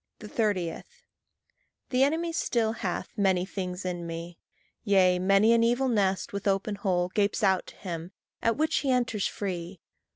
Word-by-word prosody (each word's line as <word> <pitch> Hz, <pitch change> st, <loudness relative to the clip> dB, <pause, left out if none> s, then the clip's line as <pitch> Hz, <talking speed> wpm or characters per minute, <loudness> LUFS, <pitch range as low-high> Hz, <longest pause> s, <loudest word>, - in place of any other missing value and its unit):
30. 205 Hz, -5 st, -1 dB, 1.1 s
The 255 Hz, 0 st, +2 dB
enemy 325 Hz, +4 st, +1 dB
still 230 Hz, -8 st, +1 dB
hath 210 Hz, -6 st, -3 dB
many 190 Hz, -3 st, +2 dB
things 185 Hz, -1 st, -5 dB
in 175 Hz, -2 st, -3 dB
me; 165 Hz, +1 st, -7 dB, 0.4 s
Yea, 185 Hz, -4 st, +4 dB
many 195 Hz, +4 st, +4 dB
an 230 Hz, 0 st, +4 dB
evil 245 Hz, +3 st, +2 dB
nest 195 Hz, -5 st, 0 dB
with 200 Hz, 0 st, -3 dB
open 195 Hz, +2 st, +1 dB
hole 185 Hz, -3 st, 0 dB
Gapes 205 Hz, +3 st, 0 dB
out 190 Hz, -2 st, +2 dB
to -, -, -12 dB
him, 170 Hz, -2 st, -6 dB, 0.3 s
at 230 Hz, +1 st, +1 dB
which 310 Hz, +1 st, +1 dB
he 275 Hz, -, 0 dB
enters 240 Hz, -5 st, +1 dB
free. 180 Hz, -2 st, -5 dB
200 Hz, 155 wpm, -28 LUFS, 180-230 Hz, 1.1 s, Yea